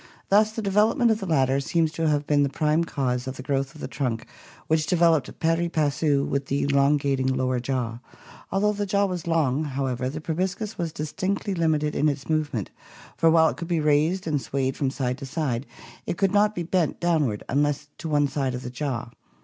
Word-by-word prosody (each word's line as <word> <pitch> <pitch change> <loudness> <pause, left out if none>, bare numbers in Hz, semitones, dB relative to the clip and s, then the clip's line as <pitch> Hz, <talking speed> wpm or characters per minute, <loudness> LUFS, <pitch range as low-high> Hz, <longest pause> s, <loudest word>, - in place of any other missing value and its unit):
Thus 215 +2 +4
the 220 0 -5
development 220 +5 +3
of 220 - +1
the 195 - -5
latter 135 -4 +2
seems 160 +3 +1
to 165 0 -1
have 150 -1 +1
been 145 -1 +3
the 140 - +2
prime 155 +3 +1
cause 130 -5 -2
of 130 - -5
the 130 - -7
growth 135 0 -1
of 155 - -11
the - - -3
trunk 120 -5 -3 0.4
which 155 -1 +1
developed 165 -4 +2
pari 165 +1 +1
passu 145 -2 +1
with 140 0 -2
the 140 +1 0
elongating 140 -1 +2
lower 130 -1 0
jaw. 120 -2 -2 0.5
Although 210 +2 +2
the 205 0 -3
jaw 200 +1 +2
was 180 -3 -4
long, 155 -4 +1
however, 130 -2 -2
the 150 +3 -5
proboscis 185 +7 -3
was 170 -2 -3
distinctly 185 +7 -2
limited 155 -3 +1
in 150 - +2
its 140 -1 -4
move 155 -2 0
ment, 105 -6 -4 0.4
for 165 - +4
while 160 0 +5
it - - -6
could 170 - -5
be 170 -2 +1
raised 155 +5 +2
and 150 -4 0
swayed 135 -1 -1
from 140 - 0
side 130 -1 -2
to 135 - -6
side 135 -4 -2 0.4
it - - -2
could 195 -2 +2
not 205 +1 +3
be 175 - -2
bent 170 -1 0
downward 155 -11 +1
unless 145 +2 0
to 165 - -5
one 145 -1 +3
side 135 -3 -2
of 125 - -6
the 125 - -6
jaw. 125 -2 -3
150 Hz, 210 wpm, -25 LUFS, 135-170 Hz, 0.5 s, while